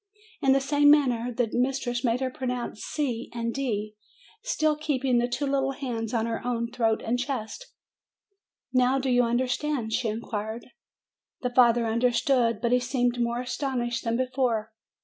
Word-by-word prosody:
In* 270 -1 +4
the 275 - +4
same 290 +1 +3
manner, 250 -5 +3
the 240 0 0
mistress 245 -1 0
made 240 +1 +1
her 260 -1 -1
pro 260 0 -5
nounce 245 -3 -3
c 250 -5 -3
and 230 0 -2
d, 215 -6 -2 0.5
still 310 -11 +1
keeping 270 -5 0
the 240 - +1
two 265 +4 -2
little 270 -1 0
hands 235 -5 -4
on 230 -2 0
her 230 -1 -3
own 235 -1 -2
throat 225 -3 0
and 245 +2 0
chest. 265 - -4 1.0
"Now 255 +1 +3
do 265 -1 0
you 245 0 +5
understand?" 245 0 -1
she 245 0 0
inquired. 220 0 -4 0.8
The 250 - -1
father 240 -1 +5
understood; 235 0 +2
but 235 - +1
he 250 - +4
seemed 245 -1 0
more 235 +1 -1
as 250 0 -4
tonished 240 -4 -2
than 230 0 0
before. 250 -4 0
245 Hz, 170 wpm, -27 LUFS, 230-265 Hz, 1.0 s, you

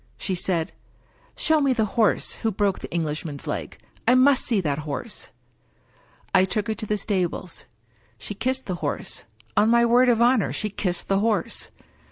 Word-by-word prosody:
She 190 - -2
said, 175 -2 0 0.3
" - - -34
Show 315 -2 +3
me 275 -2 +3
the 225 -3 +1
horse 225 -4 +2
who 225 - +1
broke 200 -1 0
the - - -8
Englishman's 155 -3 -3
leg! - - -4 0.3
I 250 - +6
must 260 +1 +5
see 230 -5 +2
that 150 -5 -1
horse! 155 +10 -5 0.5
"" - - -35 0.3
I 185 - +6
took 200 +2 -1
her - - +1
to 215 0 -7
the 210 - 0
stables. 185 -4 -2 0.5
She 205 - -6
kissed 260 +6 -2
the 180 -3 -4
horse— 145 -2 -4 0.3
on 210 +2 +4
my 235 0 +5
word 245 +2 +5
of 235 -2 +3
honor, 240 -3 +3
she 215 - -2
kissed 180 -3 -2
the 195 0 +2
horse 210 -4 0
210 Hz, 185 wpm, -24 LUFS, 180-235 Hz, 0.5 s, I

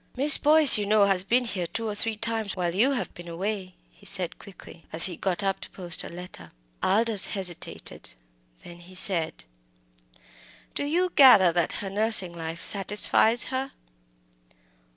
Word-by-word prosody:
"Miss 280 +3 +4
Boyce, 300 -5 +6
you 205 - -4
know, 210 -1 +3
has 195 -2 -1
been 245 +5 0
here 185 -6 -4
two 225 +6 -5
or 210 - -4
three 220 +1 -3
times 225 -2 -3
while 175 -2 -3
you 245 +9 +1
have 245 - -5
been 175 -1 -12
away," 185 +2 -6 0.2
he - - -26
said 185 -4 +1
quickly, 180 -3 -15
as 160 - +2
he 180 - -3
got 190 +3 -3
up 195 -1 -2
to - - -10
post 175 -3 -3
a - - -9
letter. 175 - -11 0.3
Aldous 215 0 +3
hesitated; 180 -3 -2 0.5
then 175 0 -13
he 180 +2 -15
said 175 -4 0 1.3
"Do 285 - -4
you 355 +5 -1
gather 225 -10 +6
that 175 -1 0
her - - -5
nursing 205 -3 +1
life 165 0 -7
satisfies 210 +3 +2
her?" 265 +1 -4
195 Hz, 165 wpm, -25 LUFS, 175-225 Hz, 1.3 s, Boyce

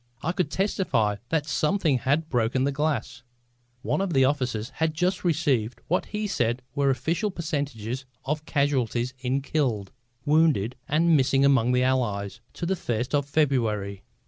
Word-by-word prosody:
I 165 - +1
could 180 -4 -1
testify 140 - 0
that 160 -2 +1
something 155 -3 +1
had 145 +6 +1
broken 125 -1 +1
the 140 - +1
glass! 135 -5 -2 0.6
One 190 - 0
of 195 -3 -1
the 135 -2 +5
officers 125 -5 -1
had 160 0 0
just 180 +3 0
received 140 -9 +1
what 180 - +1
he 210 0 -3
said 120 - 0
were 140 -1 +2
official 160 - 0
percentages 140 - -3 0.2
of 150 +2 -2
casualties 130 -4 0
in 130 +2 -1
killed, 125 -10 -1 0.3
wounded 145 -7 +3
and 165 +2 +3
missing 135 0 +3
among 130 -4 +4
the 125 0 +3
Allies, 110 -7 -1
to 170 - -4
the 190 +3 +1
first 120 -6 -3
of 145 -1 +1
February. 115 -10 0
140 Hz, 155 wpm, -26 LUFS, 120-155 Hz, 0.6 s, the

